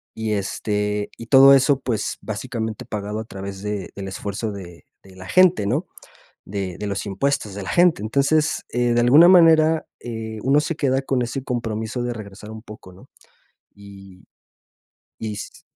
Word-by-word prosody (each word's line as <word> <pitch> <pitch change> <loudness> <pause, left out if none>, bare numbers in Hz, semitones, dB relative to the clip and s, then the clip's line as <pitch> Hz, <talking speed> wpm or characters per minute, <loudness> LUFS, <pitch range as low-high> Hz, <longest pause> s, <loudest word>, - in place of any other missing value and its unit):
y, 110 -1 -2
este, 105 +1 -2
y 115 - -9
todo 135 +3 +8
eso, 135 0 +3
pues, 115 -5 -3
básicamente 110 +1 -5
pagado 105 0 -4
a - - -4
través 100 -1 -8
de 105 -3 -4
del 95 0 -6
esfuerzo 100 +3 -4
de 90 -4 -10 0.2
de 95 -1 -17
la 90 0 -10
gente, 185 - +4
¿no?, 145 - -1 0.6
De 95 -2 -5
de 105 - -4
los 100 -1 -3
impuestos 105 +1 -1
de 100 - -6
la - - -7
gente, 175 - +3
entonces, 140 +7 +1
eh, 120 0 +1
de 120 - +3
alguna 140 +8 +7
manera, 160 -3 +5 0.2
eh, 110 -2 -6
uno 140 +3 +3
se 155 +1 -3
queda 135 -3 0
con 135 -2 0
ese 120 +3 -4
compromiso 115 -1 -3
de 120 0 -2
regresar 105 -1 -10
un 110 0 -10
poco, 105 -5 -13
¿no? 90 - -17 0.7
Y 95 -2 -14 0.9
y 110 -1 -4
s 105 - -9
110 Hz, 170 wpm, -22 LUFS, 100-135 Hz, 0.9 s, todo